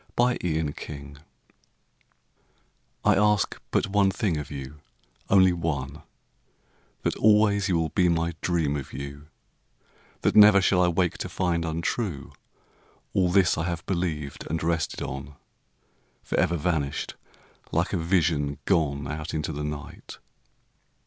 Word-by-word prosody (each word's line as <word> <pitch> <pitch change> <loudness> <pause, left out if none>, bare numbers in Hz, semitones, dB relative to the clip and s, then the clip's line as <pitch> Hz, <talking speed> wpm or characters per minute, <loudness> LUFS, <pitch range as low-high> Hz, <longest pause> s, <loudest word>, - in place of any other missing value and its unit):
To 120 +1 +4
a 80 -3 -1
Friend 70 -1 -9 1.9
I - - +6
ask 105 0 +2
but - - +1
one 100 0 +2
thing 95 -3 -1
of 75 - -5
you, 70 0 -8 0.5
only 95 -2 +6
one, 75 -4 -3 1.0
That - - 0
always 105 -2 +4
you 90 - +2
will 80 -1 0
be 90 +3 +2
my 85 0 0
dream 80 -5 0
of 70 - -8
you; 70 +2 -7 0.9
That - - +1
never 105 -1 +8
shall 95 -1 +3
I 90 - +4
wake 85 0 0
to - - -4
find 85 -3 0
untrue 85 - -3 0.8
All 90 -2 +2
this 90 -3 +3
I 80 - -1
have 85 -1 -4
believed 80 -7 -3
and 80 +1 -2
rested 80 -1 -1
on, 70 +2 -6 0.9
Forever 85 - +1
vanished, 75 -4 -2 0.6
like 85 +5 0
a - - +2
vision 80 -4 +1
gone 70 -6 +1
Out 75 +2 -5
into 80 0 -2
the 75 +1 -4
night. 75 -1 -7
85 Hz, 135 wpm, -26 LUFS, 75-90 Hz, 1.9 s, never